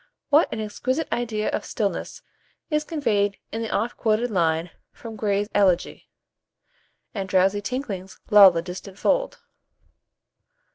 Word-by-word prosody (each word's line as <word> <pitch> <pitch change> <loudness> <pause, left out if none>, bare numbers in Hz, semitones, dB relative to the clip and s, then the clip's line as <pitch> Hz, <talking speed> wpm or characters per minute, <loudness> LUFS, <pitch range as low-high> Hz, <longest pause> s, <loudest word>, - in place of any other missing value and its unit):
What 300 +3 +4
an 225 - -4
exquisite 255 +8 -2
idea 220 -3 -2
of - - -2
stillness - - -3 0.5
is 300 0 +1
conveyed 210 -11 0
in 225 - -3
the 225 - -3
oft 230 +4 -2
quoted 225 +2 +1
line 165 -2 0 0.2
from 225 -2 -10
Gray's 205 -1 0
"Elegy:" 185 -4 +1 1.0
"And 195 -4 -4
drowsy 195 +2 +2
tinklings 200 -5 -5
lull 205 -2 +10
the 165 -2 -2
distant 185 +2 -8
fold." - - 0
210 Hz, 130 wpm, -24 LUFS, 190-240 Hz, 1.0 s, lull